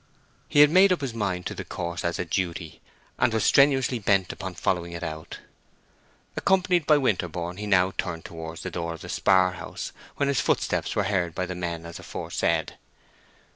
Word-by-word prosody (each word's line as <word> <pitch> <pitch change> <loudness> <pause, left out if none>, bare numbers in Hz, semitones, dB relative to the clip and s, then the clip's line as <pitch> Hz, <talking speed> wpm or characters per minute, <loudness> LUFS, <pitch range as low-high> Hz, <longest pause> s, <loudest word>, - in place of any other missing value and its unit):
He 145 - +6
had 150 0 +7
made 190 +2 +6
up 180 - +1
his 135 -4 -3
mind 95 -5 -2
to - - -3
the - - -6
course 85 0 -5
as 85 0 -1
a - - -2
duty, 85 -2 -3 0.4
and 130 -2 +3
was 110 -1 0
strenuously 135 -3 +4
bent 100 -3 +2
upon 95 -2 -6
following 85 -1 -1
it 85 0 -6
out. 80 -1 -6 1.0
Accompanied 180 -4 +2
by 150 - +6
Winterborne, 90 - -1
he 105 +1 -5
now 95 -2 +4
turned 85 -3 -3
towards 80 0 -7
the - - -4
door 85 -1 -3
of 80 - -13
the - - -9
spar 95 -1 +3
house, 90 - -7 0.2
when 140 - 0
his 140 -3 +2
footsteps - - 0
were 105 - +2
heard 90 -4 -1
by 90 - -1
the 90 - -5
men 85 -2 -4
as 85 - -8
aforesaid. - - -2
95 Hz, 190 wpm, -26 LUFS, 85-120 Hz, 1.0 s, had